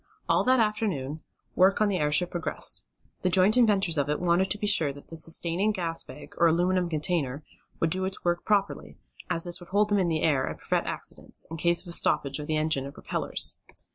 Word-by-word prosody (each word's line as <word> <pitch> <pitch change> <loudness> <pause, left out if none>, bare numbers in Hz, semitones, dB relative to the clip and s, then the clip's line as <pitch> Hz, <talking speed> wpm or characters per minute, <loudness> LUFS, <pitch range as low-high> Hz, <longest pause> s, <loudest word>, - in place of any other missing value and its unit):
All - - +2
that 255 0 +4
afternoon 195 -10 -1 0.3
work 190 +2 +4
on 215 - +3
the 195 -2 -1
airship 150 +4 +2
progressed. 175 -3 -4 0.4
The 185 - +1
joint 190 +4 +3
inventors 200 -9 +2
of 145 0 -1
it 150 - -1
wanted 180 +2 +1
to 210 - 0
be 210 - -4
sure 200 -8 +3
that 140 +1 -14
the 165 - -8
sustaining 170 +5 +2
gas 170 -5 -4
bag, - - -12
or 170 - +5
aluminum 175 +2 +1
container, 155 -4 -2 0.4
would 165 - 0
do 185 +2 0
its 190 -1 -5
work 175 0 0
properly, 205 -2 -1 0.3
as 165 - +2
this 175 -1 0
would 175 -1 -13
hold 205 +2 +2
them 205 -1 +2
in 185 - +1
the 160 -2 -1
air, 140 -5 +2
and - - -5
prevent - - -2
accidents, - - -4
in 165 - -5
case 170 +2 +3
of - - -11
a - - -5
stoppage 140 -4 +1
of 150 - -6
the 155 - 0
engine 155 -3 0
or - - -8
propellers. - - +1
175 Hz, 220 wpm, -27 LUFS, 155-195 Hz, 0.4 s, or